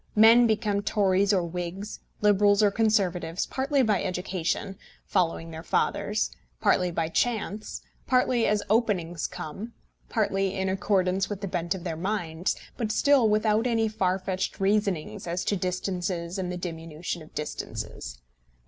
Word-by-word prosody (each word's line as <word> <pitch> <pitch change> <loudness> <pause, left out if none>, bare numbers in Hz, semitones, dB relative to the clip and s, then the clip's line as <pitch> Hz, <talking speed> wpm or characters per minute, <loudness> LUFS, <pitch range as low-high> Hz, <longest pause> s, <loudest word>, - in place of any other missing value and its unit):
Men 230 +3 +7
become 210 -2 +1
Tories 200 -1 +2
or 190 -3 +2
Whigs, 180 +4 -5 0.2
Liberals 205 0 +4
or 205 - +5
Conservatives, 190 -6 +1
partly 270 +1 +1
by 210 -5 +2
education, 185 +2 -2 0.3
following 165 -3 0
their 160 0 -7
fathers, 165 - 0 0.3
partly 180 -1 +3
by 165 -1 -1
chance, 215 +2 -2 0.2
partly 250 -2 +3
as 210 -1 +1
openings 195 -7 +1
come, 205 +10 -7 0.4
partly 195 -3 0
in 190 0 0
accordance 190 0 +1
with 205 -2 -5
the 200 - -2
bent 175 0 -1
of 180 - -7
their 170 -3 -3
minds, 175 -2 -1 0.2
but 225 -3 -1
still 270 -2 +4
without 215 +2 +2
any 225 -2 +2
far 190 -4 0
fetched 190 0 -3
reasonings 195 -5 0
as 175 +2 -2
to 205 - +1
distances 180 -1 -2
and 180 -1 -2
the 180 - -3
diminution 165 -1 -5
of 155 - -15
distances. - - -5
195 Hz, 145 wpm, -27 LUFS, 175-215 Hz, 0.4 s, Men